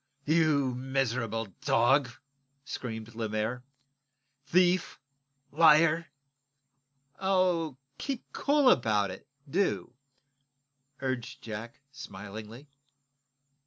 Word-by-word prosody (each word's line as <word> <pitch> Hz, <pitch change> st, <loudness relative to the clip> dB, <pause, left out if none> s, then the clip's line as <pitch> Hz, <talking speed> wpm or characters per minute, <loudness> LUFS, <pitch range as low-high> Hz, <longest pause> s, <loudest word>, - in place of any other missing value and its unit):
"You 150 Hz, -4 st, +3 dB
miser 130 Hz, -1 st, -1 dB
r -, -, -1 dB
r -, -, -8 dB
rable 115 Hz, -3 st, -4 dB
dog!" 130 Hz, +3 st, +3 dB, 0.6 s
screamed 110 Hz, -4 st, -6 dB
Lemaire. 110 Hz, +2 st, -2 dB, 0.8 s
"Thief! 180 Hz, +1 st, +2 dB, 0.5 s
Liar!" 160 Hz, +1 st, +5 dB, 1.1 s
"Oh, 180 Hz, -6 st, +1 dB, 0.2 s
keep 270 Hz, -4 st, -3 dB
cool 285 Hz, -2 st, +4 dB
about 105 Hz, -5 st, +2 dB
it, 95 Hz, -, -11 dB, 0.2 s
do," 180 Hz, -5 st, 0 dB, 1.1 s
urged 130 Hz, -3 st, -4 dB
Jack, 115 Hz, +3 st, -7 dB
smilingly. 110 Hz, +3 st, -9 dB
130 Hz, 85 wpm, -29 LUFS, 115-165 Hz, 1.1 s, Liar